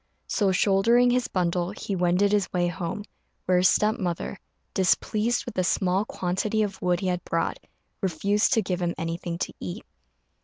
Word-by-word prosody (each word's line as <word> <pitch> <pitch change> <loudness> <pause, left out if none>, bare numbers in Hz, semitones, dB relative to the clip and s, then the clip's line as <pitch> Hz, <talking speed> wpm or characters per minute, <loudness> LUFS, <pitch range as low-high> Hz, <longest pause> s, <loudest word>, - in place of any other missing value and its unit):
So, 200 -4 +1
shouldering 220 +6 +4
his 250 0 +1
bundle, 175 -1 0
he 200 0 -4
wended 180 +3 +2
his 205 -3 +1
way 175 -1 +1
home, 175 +3 -3 0.4
where 180 -1 +3
his 185 +1 +5
step 215 +2 +2
mother, 180 +1 -3 0.3
displeased 215 +5 +1
with - - -6
the 185 - 0
small 185 +2 +1
quantity 205 +5 -1
of 195 -2 -4
wood 180 -1 +1
he 190 - -1
had 180 -1 -1
brought, 165 - -1 0.4
refused 200 +2 +1
to 225 -3 +3
give 180 -1 -2
him 175 -1 -1
anything 170 +1 -3
to - - -3
eat. 90 -2 -6
185 Hz, 170 wpm, -26 LUFS, 175-210 Hz, 0.4 s, his